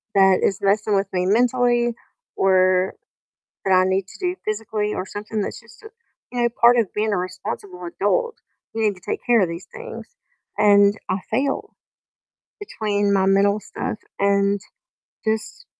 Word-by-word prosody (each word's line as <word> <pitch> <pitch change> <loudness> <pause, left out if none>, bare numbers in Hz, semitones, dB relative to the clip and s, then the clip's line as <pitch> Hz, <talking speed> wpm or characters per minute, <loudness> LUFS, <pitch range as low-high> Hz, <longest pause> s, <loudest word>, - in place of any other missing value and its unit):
that 190 -1 +5
is 195 - +1
messing 205 +1 +2
with 195 0 +1
me 180 0 0
mentally 240 +2 +2 0.4
or 185 -1 +3 0.7
that 190 - +1
I 185 0 +5
need 190 0 0
to - - -14
do 360 -1 -1
physically 215 0 -2
or 185 - -3
something 210 +2 -4
that's - - -4
just, 230 - -19 0.5
you 245 -1 -2
know, 235 - +4
part 240 +1 +7
of 220 -5 0
being 215 0 0
a 200 - +1
responsible 185 0 -5
adult, 325 - 0 0.4
you 225 - -2
need 205 -2 +2
to 180 - -17
take - - -2
care 235 -3 +4
of 180 - +2
these 170 +2 -7
things, 470 0 -8 0.5
and 205 -1 +5 0.2
I 190 - 0
fail 270 +5 -1 0.8
between 205 - -1
my 190 -1 +3
mental 200 +2 +3
stuff 210 - -5 0.2
and 200 0 +2 0.7
just 220 - -2
205 Hz, 160 wpm, -22 LUFS, 195-230 Hz, 0.8 s, part